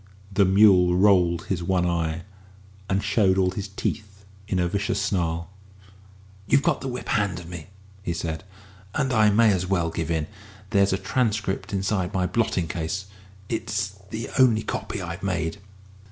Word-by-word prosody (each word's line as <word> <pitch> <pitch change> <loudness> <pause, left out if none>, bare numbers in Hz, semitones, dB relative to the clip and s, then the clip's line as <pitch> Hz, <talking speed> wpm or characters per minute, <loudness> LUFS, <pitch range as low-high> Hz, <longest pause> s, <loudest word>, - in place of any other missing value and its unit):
The 100 0 +4
mule 95 -2 +5
rolled 90 -4 +4
his 90 -3 -2
one 90 0 +1
eye, 85 -1 -1 0.7
and 95 +1 +1
showed 100 -2 +3
all 95 -1 +3
his 100 +2 -5
teeth 100 0 -5 0.2
in 95 - -1
a 90 -1 +2
vicious 100 +2 -1
snarl. 85 -3 -1 1.0
"You've 140 +4 +4
got - - +1
the 135 - -4
whip 125 -1 -5
hand 100 -5 +1
of 85 - -10
me," 85 -3 -8 0.3
he 90 - -3
said, 80 0 -3 0.5
"and 135 -3 0
I 110 -2 +5
may 110 0 +5
as 90 -1 -1
well 85 -3 +1
give 80 0 -3
in. 80 -2 0 0.5
There's 100 -2 +4
a 95 - +1
transcript 105 -4 -1
inside 95 -2 -1
my 90 -1 +2
blotting 90 -3 0
case 80 +4 -3 0.4
it's 105 -2 -2 0.2
the 110 +1 -5
only 115 -4 +5
copy 100 - -4
I've 85 +1 -6
made." 85 -2 -2
95 Hz, 165 wpm, -25 LUFS, 85-105 Hz, 1.0 s, mule